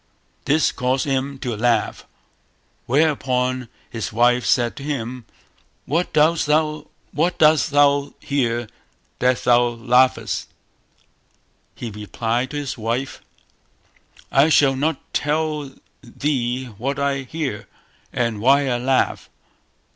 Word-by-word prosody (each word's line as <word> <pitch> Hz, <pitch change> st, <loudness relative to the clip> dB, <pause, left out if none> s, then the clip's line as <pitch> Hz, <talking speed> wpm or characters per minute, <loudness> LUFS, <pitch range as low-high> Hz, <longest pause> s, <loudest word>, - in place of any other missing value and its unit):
This 155 Hz, +3 st, +3 dB
caused 130 Hz, 0 st, -1 dB
him 135 Hz, 0 st, -1 dB
to 120 Hz, -3 st, -2 dB
laugh, 120 Hz, +2 st, 0 dB, 0.8 s
whereupon 130 Hz, -3 st, +1 dB, 0.2 s
his 110 Hz, -3 st, -5 dB
wife 120 Hz, +2 st, +2 dB
said 120 Hz, -2 st, +2 dB
to 140 Hz, -, -7 dB
him 125 Hz, -4 st, -4 dB, 0.6 s
"What 165 Hz, +5 st, -1 dB
dost 155 Hz, +1 st, +3 dB
thou 155 Hz, 0 st, +1 dB, 1.4 s
hear 120 Hz, -4 st, -1 dB, 0.5 s
that 125 Hz, 0 st, +1 dB
thou 120 Hz, 0 st, +5 dB
laughest?" 125 Hz, +2 st, +1 dB, 1.3 s
He 115 Hz, -, -6 dB
replied 115 Hz, +4 st, -2 dB
to 150 Hz, -, -5 dB
his 140 Hz, -5 st, -4 dB
wife 115 Hz, +5 st, -3 dB, 1.1 s
"I 140 Hz, +4 st, +4 dB
shall 140 Hz, -3 st, +4 dB
not 145 Hz, +2 st, 0 dB
tell 150 Hz, -1 st, -1 dB, 0.3 s
thee 130 Hz, -1 st, -2 dB
what 135 Hz, +4 st, -2 dB
I 140 Hz, -1 st, 0 dB
hear, 135 Hz, -5 st, -5 dB, 0.4 s
and 115 Hz, -4 st, -1 dB
why 135 Hz, +3 st, +4 dB
I 120 Hz, -1 st, 0 dB
laugh". 130 Hz, +1 st, 0 dB
130 Hz, 105 wpm, -21 LUFS, 120-145 Hz, 1.4 s, thou